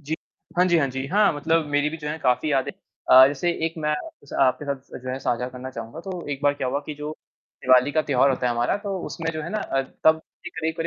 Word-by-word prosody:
जी। 155 Hz, +2 st, -3 dB, 0.4 s
हाँ 180 Hz, -, +5 dB
जी, 175 Hz, -2 st, +4 dB
हाँ 140 Hz, -, +2 dB
जी। 130 Hz, +1 st, -4 dB
हाँ, 205 Hz, +6 st, +3 dB
मतलब 160 Hz, +2 st, +1 dB
मेरी 145 Hz, 0 st, +1 dB
भी 160 Hz, -, -5 dB
जो 150 Hz, -2 st, -6 dB
है 155 Hz, +2 st, -3 dB
काफ़ी 150 Hz, +1 st, +1 dB
यादें 135 Hz, -2 st, +1 dB, 0.4 s
अ, 130 Hz, +1 st, +10 dB
जैसे 145 Hz, +5 st, -1 dB, 0.2 s
एक 165 Hz, -, -4 dB
मैं 150 Hz, -1 st, 0 dB, 0.3 s
स -, -, -15 dB
आपके 135 Hz, +2 st, +2 dB
साथ 140 Hz, -1 st, -2 dB
स -, -, -10 dB
जो 130 Hz, -, -7 dB
है 130 Hz, -, -3 dB
साझा 125 Hz, 0 st, -1 dB
करना 130 Hz, +1 st, -8 dB
चाहूँगा 115 Hz, +5 st, -7 dB
तो 180 Hz, -1 st, -6 dB
एक 140 Hz, -1 st, -3 dB
बार 145 Hz, 0 st, +3 dB
क्या 130 Hz, -2 st, -2 dB
हुआ 135 Hz, +3 st, 0 dB
कि 150 Hz, -, -5 dB
जो 150 Hz, +1 st, -4 dB, 0.5 s
दिवाली 130 Hz, +2 st, +5 dB
का 155 Hz, +1 st, +2 dB
त्योहार 140 Hz, -2 st, +3 dB
होता 130 Hz, -1 st, 0 dB
है 120 Hz, -, +2 dB
हमारा 120 Hz, +6 st, +1 dB
तो 200 Hz, -1 st, -2 dB
उसमें 165 Hz, -1 st, -3 dB
जो 155 Hz, -1 st, -4 dB
है 160 Hz, -, -5 dB
ना 215 Hz, -, -1 dB
अ, 135 Hz, -9 st, -1 dB, 0.2 s
तब 160 Hz, 0 st, +5 dB, 0.4 s
एक 165 Hz, +1 st, -2 dB
145 Hz, 260 wpm, -24 LUFS, 130-160 Hz, 0.5 s, अ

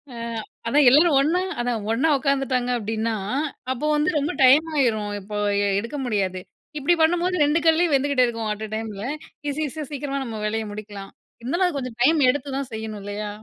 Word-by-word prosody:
ஆ, -, -, -8 dB, 0.5 s
அதான் 285 Hz, +3 st, +4 dB
எல்லோரும் 300 Hz, +3 st, +5 dB
ஒன்னா, 330 Hz, +6 st, +1 dB, 0.2 s
அதான் 240 Hz, -2 st, -1 dB
ஒன்னா 270 Hz, +8 st, +2 dB
உட்காந்துட்டாங்க 270 Hz, -2 st, 0 dB
அப்படின்னா, 225 Hz, 0 st, -2 dB, 0.6 s
அப்போ 260 Hz, +4 st, -5 dB
வந்து 300 Hz, +4 st, +2 dB
ரொம்ப 290 Hz, +1 st, -1 dB
டைம் 285 Hz, +5 st, +6 dB
ஆயிரும். 220 Hz, -6 st, +1 dB
இப்போ 210 Hz, +2 st, -6 dB, 0.4 s
எடுக்க 230 Hz, +7 st, -5 dB
முடியாது. 195 Hz, -5 st, -1 dB, 0.4 s
இப்படி 295 Hz, +5 st, +3 dB
பண்ணும்போது 350 Hz, +3 st, +2 dB
2 295 Hz, +3 st, +2 dB
கல்லயும் 325 Hz, 0 st, +3 dB
வெந்துகிட்டே 275 Hz, -2 st, +2 dB
இருக்கும். 230 Hz, -2 st, -3 dB
அட் 210 Hz, -, -8 dB
அ -, -, -15 dB
டைம்ல 220 Hz, -2 st, -5 dB, 0.5 s
ஈஸி 285 Hz, +2 st, -3 dB
ஈஸியா 305 Hz, +2 st, -6 dB
சீக்கிரமா 275 Hz, -1 st, -3 dB
நம்ம 225 Hz, -3 st, -6 dB
வேலைய 220 Hz, +1 st, -1 dB
முடிக்கலாம். 205 Hz, -2 st, -8 dB, 0.3 s
இருந்தாலும் 340 Hz, +10 st, 0 dB
அது 315 Hz, -, -3 dB
கொஞ்சம் 250 Hz, -3 st, -6 dB
டைம் 315 Hz, +4 st, +4 dB
எடுத்து 280 Hz, +1 st, -1 dB
தான் 275 Hz, -2 st, -4 dB
செய்யணும். 220 Hz, -1 st, -5 dB
இல்லையா? 205 Hz, +1 st, -5 dB
255 Hz, 175 wpm, -23 LUFS, 220-295 Hz, 0.6 s, டைம்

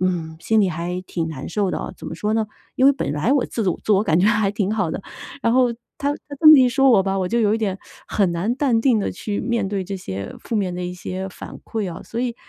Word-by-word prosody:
嗯， 170 Hz, -3 st, -1 dB
心 220 Hz, +4 st, +2 dB
里 195 Hz, -, +3 dB
还 170 Hz, +2 st, -3 dB
挺 165 Hz, -2 st, -3 dB
难 140 Hz, -3 st, -6 dB
受 200 Hz, -1 st, 0 dB
的 -, -, -2 dB
哦， -, -, -6 dB
怎 -, -, -10 dB
么 -, -, -5 dB
说 210 Hz, +5 st, -1 dB
呢？ 220 Hz, -1 st, +1 dB, 0.3 s
因 260 Hz, -, +5 dB
为 280 Hz, -, +7 dB
本 260 Hz, -, -3 dB
来 150 Hz, -, 0 dB
我 280 Hz, -3 st, +3 dB
自我- 195 Hz, -7 st, -1 dB
自 215 Hz, -, +3 dB
我 200 Hz, +1 st, +4 dB
感 165 Hz, -5 st, +2 dB
觉 190 Hz, -, +4 dB
还 215 Hz, -2 st, +3 dB
挺 205 Hz, 0 st, -1 dB
好 185 Hz, -7 st, 0 dB
的， -, -, -4 dB, 0.4 s
然 230 Hz, -, +2 dB
后 250 Hz, -1 st, +4 dB, 0.3 s
他 285 Hz, +1 st, 0 dB
他 285 Hz, -1 st, -8 dB
这 310 Hz, -, +8 dB
么 305 Hz, -, +10 dB
一 255 Hz, -1 st, +5 dB
说 270 Hz, +1 st, +4 dB
我 215 Hz, -, +6 dB
吧， 195 Hz, 0 st, -1 dB
我 185 Hz, -1 st, -1 dB
就 235 Hz, -, +1 dB
有 210 Hz, -1 st, +3 dB
一 225 Hz, -, -1 dB
点 195 Hz, -3 st, -2 dB, 0.3 s
很 195 Hz, -4 st, +1 dB
难 180 Hz, +8 st, 0 dB
淡 250 Hz, -6 st, +2 dB
定 240 Hz, -3 st, +3 dB
地 200 Hz, -, -2 dB
去 205 Hz, +3 st, -4 dB
面 235 Hz, -5 st, -1 dB
对 195 Hz, -2 st, -2 dB
这 195 Hz, +1 st, -4 dB
些 100 Hz, -, -6 dB
负 230 Hz, -, -3 dB
面 185 Hz, -3 st, -1 dB
的 180 Hz, 0 st, -4 dB
一 180 Hz, -, -4 dB
些 185 Hz, +1 st, -5 dB
反 -, -, -10 dB
馈 205 Hz, -6 st, -3 dB
哦。 -, -, -9 dB
所 230 Hz, -, -7 dB
以 245 Hz, -2 st, -1 dB
205 Hz, 305 characters per minute, -22 LUFS, 180-230 Hz, 0.4 s, 么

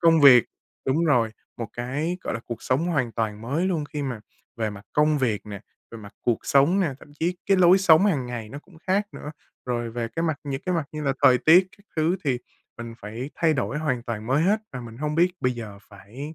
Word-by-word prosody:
công 165 Hz, -2 st, +5 dB
việc 125 Hz, -5 st, +8 dB, 0.4 s
đúng 155 Hz, +6 st, +2 dB
rồi, 120 Hz, -8 st, +3 dB, 0.3 s
một 115 Hz, -3 st, -5 dB
cái, 145 Hz, +9 st, -3 dB
gọi -, -, -4 dB
là, 115 Hz, -, -4 dB
cuộc 120 Hz, -2 st, -6 dB
sống 135 Hz, +6 st, 0 dB
hoàn 135 Hz, -9 st, 0 dB
toàn 110 Hz, -2 st, -2 dB
mới 145 Hz, +10 st, -1 dB
luôn 165 Hz, -6 st, -1 dB
khi 150 Hz, -, -3 dB
mà 125 Hz, -6 st, -4 dB, 0.4 s
về 110 Hz, -2 st, -1 dB
mặt 100 Hz, 0 st, -10 dB
công 150 Hz, 0 st, +3 dB
việc 115 Hz, -6 st, -1 dB
nè, 100 Hz, -2 st, -7 dB, 0.3 s
về 115 Hz, -, -9 dB
mặt 100 Hz, -1 st, -12 dB
cuộc 120 Hz, -2 st, +1 dB
sống 145 Hz, +8 st, +4 dB
nè, 160 Hz, -8 st, 0 dB
thậm 145 Hz, -, -15 dB
chí 175 Hz, +2 st, 0 dB
cái 195 Hz, -, +4 dB
lối 185 Hz, +1 st, +6 dB
sống 185 Hz, +1 st, +6 dB
hàng 140 Hz, -10 st, 0 dB
ngày 115 Hz, -3 st, -6 dB
nó 140 Hz, -, -8 dB
cũng 165 Hz, +3 st, -19 dB
khác 200 Hz, +2 st, +1 dB
nữa. 150 Hz, -, -7 dB, 0.4 s
Rồi 120 Hz, -2 st, -2 dB
về 115 Hz, 0 st, -3 dB
cái 165 Hz, -, 0 dB
mặt 160 Hz, -4 st, -1 dB
những 135 Hz, -1 st, -3 dB
cái 180 Hz, -, +1 dB
mặt 165 Hz, -3 st, 0 dB
như 155 Hz, -, -5 dB
là 140 Hz, -2 st, +1 dB
thời 125 Hz, -1 st, +7 dB
tiết 175 Hz, +7 st, +6 dB
các 200 Hz, -, -24 dB
thứ 160 Hz, +4 st, +2 dB
thì 130 Hz, -4 st, +1 dB, 0.4 s
mình 115 Hz, -1 st, -7 dB
phải 115 Hz, +7 st, -6 dB
thay 160 Hz, -2 st, +2 dB
đổi 135 Hz, +2 st, -2 dB
hoàn 130 Hz, -6 st, -1 dB
toàn 110 Hz, -2 st, -5 dB
mới 140 Hz, +5 st, +2 dB
hết 210 Hz, +4 st, +2 dB
và 125 Hz, -, -5 dB
mình 115 Hz, -2 st, -10 dB
hông 150 Hz, 0 st, -2 dB
biết 175 Hz, +3 st, +3 dB
bây 125 Hz, -, +1 dB
giờ 110 Hz, -4 st, -8 dB
phải 120 Hz, +10 st, -9 dB
140 Hz, 240 wpm, -25 LUFS, 115-165 Hz, 0.4 s, việc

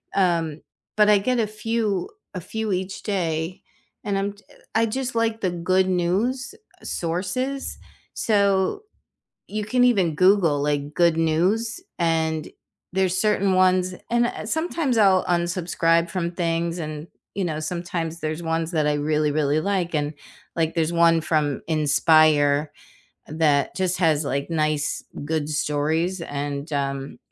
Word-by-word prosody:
Um, 165 Hz, -5 st, +1 dB, 0.3 s
but 210 Hz, 0 st, +5 dB
I 210 Hz, -, +7 dB
get 250 Hz, +4 st, 0 dB
a 220 Hz, -, +1 dB
few 215 Hz, -3 st, -2 dB, 0.3 s
a -, -, -2 dB
few 220 Hz, +4 st, -4 dB
each 185 Hz, +1 st, -3 dB
day 170 Hz, -3 st, -2 dB, 0.4 s
and 200 Hz, -1 st, -1 dB
I'm 200 Hz, +1 st, -1 dB
j 205 Hz, -, -21 dB
eh, -, -, -19 dB, 0.2 s
I 225 Hz, +1 st, +4 dB
just 260 Hz, +3 st, -3 dB
like 225 Hz, -1 st, 0 dB
the 185 Hz, -, +1 dB
good 185 Hz, +2 st, +1 dB
news 205 Hz, -, 0 dB, 0.3 s
sources. 195 Hz, +11 st, -2 dB, 0.4 s
So, 200 Hz, -, +1 dB, 0.7 s
you 215 Hz, 0 st, -3 dB
can 245 Hz, +4 st, +2 dB
even 195 Hz, -10 st, +3 dB
Google, 180 Hz, -5 st, +4 dB
like, 145 Hz, 0 st, -1 dB
"good 170 Hz, -2 st, +3 dB
news", 185 Hz, -, +1 dB, 0.2 s
and 160 Hz, -2 st, 0 dB, 0.4 s
there's 185 Hz, -1 st, +1 dB
certain 200 Hz, -2 st, +2 dB
ones 185 Hz, 0 st, +3 dB, 0.2 s
and, 240 Hz, 0 st, +3 dB
uh, 215 Hz, -, -5 dB
sometimes 320 Hz, -2 st, 0 dB
I'll 195 Hz, -3 st, +5 dB
unsubscribe 170 Hz, -1 st, +1 dB
from 170 Hz, -1 st, -2 dB
things, 170 Hz, 0 st, -1 dB
and, 155 Hz, -1 st, -5 dB, 0.3 s
you 195 Hz, -, -1 dB
know, 155 Hz, -3 st, -2 dB
sometimes 170 Hz, 0 st, -3 dB
there's 155 Hz, +2 st, -3 dB
ones 165 Hz, 0 st, -1 dB
that 155 Hz, -2 st, +1 dB
I 150 Hz, -, +2 dB
really, 150 Hz, +1 st, +1 dB
really 150 Hz, 0 st, +1 dB
like, 180 Hz, -1 st, -1 dB
and, 145 Hz, 0 st, 0 dB, 0.4 s
like, 165 Hz, -1 st, 0 dB
there's 165 Hz, -1 st, 0 dB
one 170 Hz, -1 st, +4 dB
from 150 Hz, -3 st, 0 dB
Inspire 150 Hz, -1 st, +3 dB, 0.6 s
that 150 Hz, -3 st, +1 dB
just 185 Hz, -1 st, 0 dB
has, 160 Hz, -4 st, +2 dB
like, 140 Hz, 0 st, -2 dB
nice, 155 Hz, -2 st, 0 dB, 0.2 s
good 155 Hz, 0 st, -1 dB
stories, 155 Hz, +5 st, 0 dB
and, 145 Hz, +1 st, -4 dB
um 140 Hz, -1 st, -3 dB
170 Hz, 145 wpm, -23 LUFS, 155-200 Hz, 0.7 s, I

